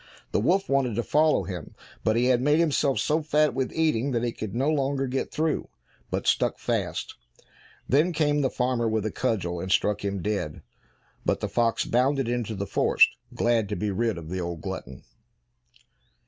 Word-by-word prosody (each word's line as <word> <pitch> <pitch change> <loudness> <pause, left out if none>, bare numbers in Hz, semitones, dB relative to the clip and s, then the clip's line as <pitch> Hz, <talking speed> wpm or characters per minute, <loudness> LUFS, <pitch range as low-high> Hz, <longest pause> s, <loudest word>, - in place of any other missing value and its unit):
The - - +2
wolf 185 - +2
wanted 135 -5 +1
to 120 - 0
follow 155 +4 +3
him, 90 -5 -7 0.3
but 110 - +2
he 120 +1 +2
had 125 -1 +3
made 150 +3 +3
himself 150 -4 +2
so 155 +2 +1
fat 150 -2 +2
with 130 0 -1
eating 140 -5 +1
that 120 -1 0
he 120 - 0
could 110 -3 -6
no 135 +4 +1
longer 140 -2 +1
get 130 +1 -2
through, 155 0 -1 0.4
but - - -2
stuck - - +2
fast. - - -2 0.7
Then 150 +7 +3
came 150 -2 +1
the 135 - +2
farmer 125 -2 0
with 110 -1 -1
a 110 - -1
cudgel 95 -9 -1
and 95 +2 -4
struck 105 +1 +2
him 100 -3 -2
dead, 100 -8 -3 0.6
but - - 0
the - - -2
fox 115 -1 +1
bounded 130 +2 +1
into 120 -2 -2
the 100 0 -3
forest, - - +4 0.3
glad 115 -4 +1
to 105 - -2
be 105 0 -2
rid 110 0 0
of 80 -2 -8
the 90 +1 -3
old 85 -2 -4
glutton. 65 +1 -7
120 Hz, 190 wpm, -26 LUFS, 105-140 Hz, 0.7 s, forest